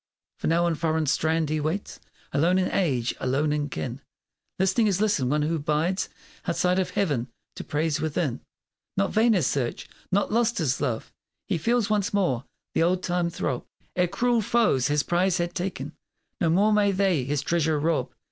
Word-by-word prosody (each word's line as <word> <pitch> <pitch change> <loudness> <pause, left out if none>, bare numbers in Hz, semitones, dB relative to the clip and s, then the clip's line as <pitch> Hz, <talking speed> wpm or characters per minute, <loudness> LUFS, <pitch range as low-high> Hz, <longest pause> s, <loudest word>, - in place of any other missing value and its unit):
For - - -2
now 170 +2 +3
on 170 - +2
foreign 160 0 0
strand 160 +1 +1
he 155 - +1
waits 160 +7 -3 0.3
Alone 170 +6 +3
in 185 - +1
age 130 -10 +1
alone 140 +4 +1
in 145 -1 -1
kin, 130 0 -5 0.6
Listening 190 +4 +2
as 195 -2 +1
listens 200 - +1
one 150 +2 +1
who 160 +1 0
bides 155 +6 0 0.4
Outside 180 +1 +2
of 185 - 0
Heaven, 145 -11 0 0.3
to - - -6
praise 155 0 -1
within. 155 -4 -1 0.6
Not 100 - +1
vain 225 +1 +4
his 180 -9 +2
search! 125 -4 -1 0.2
not 200 +2 +1
lost 235 +1 +2
his 140 -6 0
love! 120 -6 -2 0.4
He - - 0
feels 230 +3 +1
once 205 -1 +1
more 140 -11 +1 0.3
the - - +1
old 180 +2 +2
time 175 -1 0
throb 135 -6 -3 0.3
Ere 180 0 +3
cruel 235 +5 +1
foes 210 - +2
his 145 -1 +1
prize 175 +4 +1
had 175 0 -2
ta'en; 185 +2 -4 0.5
No 170 -6 +2
more 200 +6 +4
may 205 -1 +4
they 190 -7 +2
his 145 +2 -1
treasure 160 -2 +1
rob! 160 +1 0
170 Hz, 180 wpm, -26 LUFS, 150-190 Hz, 0.6 s, vain